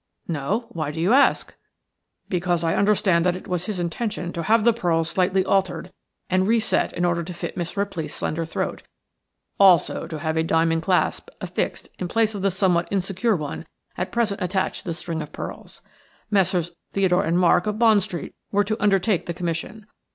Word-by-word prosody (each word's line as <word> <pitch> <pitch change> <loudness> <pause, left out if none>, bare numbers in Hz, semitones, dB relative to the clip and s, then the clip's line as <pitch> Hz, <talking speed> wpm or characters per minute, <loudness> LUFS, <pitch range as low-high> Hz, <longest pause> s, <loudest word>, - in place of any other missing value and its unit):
"No; 175 - -1
why 155 -8 -3
do 155 +2 -5
you 180 +8 +3
ask?" 280 +2 +3 0.7
"Because 175 -2 0
I 165 - +1
understand 200 -4 +3
that 180 0 +2
it 185 - -9
was 180 -1 -2
his 210 -4 -3
intention 175 +1 -3
to 170 - -3
have 220 +6 +3
the 235 +1 +5
pearls 170 -7 0
slightly 185 0 +2
altered 185 -2 0 0.4
and 185 +1 +2
reset 225 0 +2
in 175 - 0
order 175 -1 +1
to 175 +2 -6
fit - - -5
Miss 175 +2 -4
Ripley's 195 -6 -3
slender 165 +2 -2
throat; 165 - -3 0.8
also 185 -4 +4
to 160 - -5
have 160 +2 -2
a 160 - +2
diamond 165 0 +2
clasp 180 +2 0
affixed - - -3
in 180 - -2
place 220 +3 +1
of 200 - -5
the 195 - +2
somewhat 180 -2 +1
insecure 195 +3 0
one 155 0 -5 0.3
at 180 - -3
present 220 -4 0
attached 185 +1 -1
to - - -24
the 165 - -2
string 165 -1 -4
of 150 - -8
pearls. - - -8 0.5
Messrs. 185 -4 +2 0.2
Theodore 190 -1 +2
and 170 -1 +1
Mark, 180 +1 +4
of 210 0 -1
Bond 220 -3 +5
Street, 175 -2 -5 0.2
were 205 0 +3
to 215 +2 -3
undertake 200 -1 +2
the 170 - -3
commission. 175 +6 -4
180 Hz, 190 wpm, -23 LUFS, 170-200 Hz, 0.8 s, the